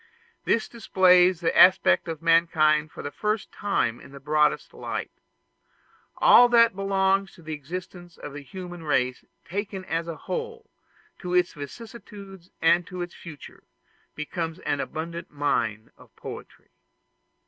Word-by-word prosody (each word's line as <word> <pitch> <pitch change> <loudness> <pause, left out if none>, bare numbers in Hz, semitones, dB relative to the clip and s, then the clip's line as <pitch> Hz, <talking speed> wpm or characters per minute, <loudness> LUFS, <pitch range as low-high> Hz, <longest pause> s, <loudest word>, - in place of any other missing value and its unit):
This 225 - +1
displays 185 -5 +3
the 170 - 0
aspect 185 -1 +5
of 165 -1 -6
mankind 155 -2 +3
for - - -9
the 145 - -5
first 210 +4 -2
time 195 - -1
in - - -14
the 140 - -11
broadest 150 +2 +1
light. - - -5 1.1
All 245 0 +7
that 230 -3 +5
belongs 195 0 0
to 170 - -17
the 155 0 -6
existence 175 +3 -8
of 145 - -9
the 145 - -7
human 175 +4 -9
race 130 -5 0 0.2
taken 195 0 -5
as 165 -1 -2
a 165 -2 -5
whole, 465 -1 -6 0.5
to 180 -1 -3
its 180 -1 +2
vicissitudes 195 - -11
and 170 +1 +4
to 180 -1 -5
its 175 - -9
future, 155 -5 -12 0.5
becomes 160 +2 -4
an 145 - -2
abundant 170 +4 -5
mine 120 -7 -2
of - - -20
poetry. - - -11
175 Hz, 140 wpm, -25 LUFS, 155-195 Hz, 1.1 s, All